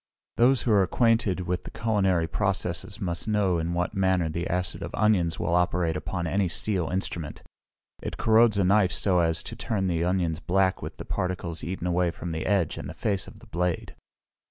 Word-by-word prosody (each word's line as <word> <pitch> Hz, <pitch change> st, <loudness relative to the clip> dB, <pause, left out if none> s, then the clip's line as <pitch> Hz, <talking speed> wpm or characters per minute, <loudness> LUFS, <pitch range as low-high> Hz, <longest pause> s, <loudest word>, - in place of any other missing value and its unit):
Those 125 Hz, +2 st, +4 dB
who 120 Hz, -, +1 dB
are 100 Hz, -2 st, +5 dB
acquainted 115 Hz, -1 st, +2 dB
with 90 Hz, 0 st, -3 dB
culinary 95 Hz, -7 st, +1 dB
processes 95 Hz, +2 st, -2 dB
must 85 Hz, -1 st, -3 dB
know 100 Hz, -5 st, +2 dB
in 85 Hz, +1 st, -2 dB
what 90 Hz, +3 st, -1 dB
manner 95 Hz, -4 st, +1 dB
the 85 Hz, +2 st, -3 dB
acid 90 Hz, +1 st, -2 dB
of -, -, -5 dB
onions 95 Hz, -6 st, +2 dB
will 85 Hz, -, -1 dB
operate 90 Hz, -1 st, +1 dB
upon 90 Hz, -3 st, -3 dB
any 95 Hz, +3 st, +1 dB
steel 90 Hz, 0 st, -1 dB
instrument; 85 Hz, -4 st, -4 dB, 0.6 s
it -, -, -5 dB
corrodes 110 Hz, -1 st, +4 dB
a 100 Hz, -, +3 dB
knife 95 Hz, 0 st, +4 dB
so 90 Hz, +1 st, +2 dB
as 85 Hz, -1 st, +1 dB
to 115 Hz, -, -7 dB
turn 110 Hz, -5 st, -2 dB
the 85 Hz, -2 st, 0 dB
onions 85 Hz, -3 st, 0 dB
black 95 Hz, +2 st, +1 dB
with -, -, -7 dB
the -, -, -7 dB
particles 90 Hz, -2 st, -3 dB
eaten 90 Hz, +1 st, -4 dB
away 90 Hz, 0 st, +2 dB
from 85 Hz, +1 st, -6 dB
the 80 Hz, 0 st, -3 dB
edge 95 Hz, -6 st, +1 dB
and -, -, -6 dB
the -, -, -8 dB
face 100 Hz, -3 st, -1 dB
of 105 Hz, -, -13 dB
the -, -, -14 dB
blade. 90 Hz, -5 st, -2 dB
90 Hz, 195 wpm, -26 LUFS, 85-100 Hz, 0.6 s, are